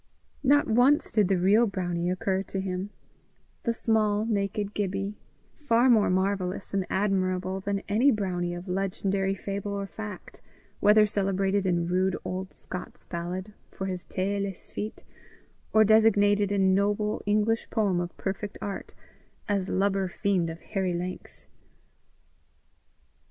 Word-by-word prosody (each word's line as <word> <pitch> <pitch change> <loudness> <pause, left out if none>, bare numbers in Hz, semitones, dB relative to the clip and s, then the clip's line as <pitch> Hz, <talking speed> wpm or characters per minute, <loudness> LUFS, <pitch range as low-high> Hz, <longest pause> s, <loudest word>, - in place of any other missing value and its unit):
Not 290 +1 +4
once 250 +6 +3
did 210 -4 +3
the 190 0 +2
real 205 +6 +4
brownie 175 -3 -2
occur 190 +1 0
to 195 0 -5
him 190 +1 -3 0.7
the 235 - 0
small, 215 -2 +2
naked 205 -1 -1
Gibbie, 195 0 -2 0.5
far 255 -3 +4
more 220 -3 +4
marvellous 190 +1 -1
and 195 -2 0
admirable 190 -1 0
than 200 +1 -2
any 220 +7 +4
brownie 180 -6 -1
of 175 +2 -8
legendary 195 +1 -1
fable 200 +1 -4
or 200 0 -3
fact, 210 -1 -9 0.4
whether 210 +1 +6
celebrated 195 -1 0
in 170 -2 +1
rude 185 +1 +1
old 185 +1 -4
Scots 180 - -4
ballad 180 +4 -5 0.2
for 190 - -6
his 185 -2 -4
taeless 195 0 -3
feet, 215 +1 -5 0.7
or 220 - +6
designated 205 -2 +4
in 190 -2 +3
noble 205 +2 +1
English 215 +2 +1
poem 200 -5 +1
of 175 0 -5
perfect 200 +1 -4
art, 200 -1 -6 0.5
as 200 -2 0
lubber 195 0 +1
fiend 185 -2 0
of 165 +1 -8
hairy 190 -4 -2
length. 180 +1 -6
195 Hz, 135 wpm, -27 LUFS, 185-210 Hz, 0.7 s, whether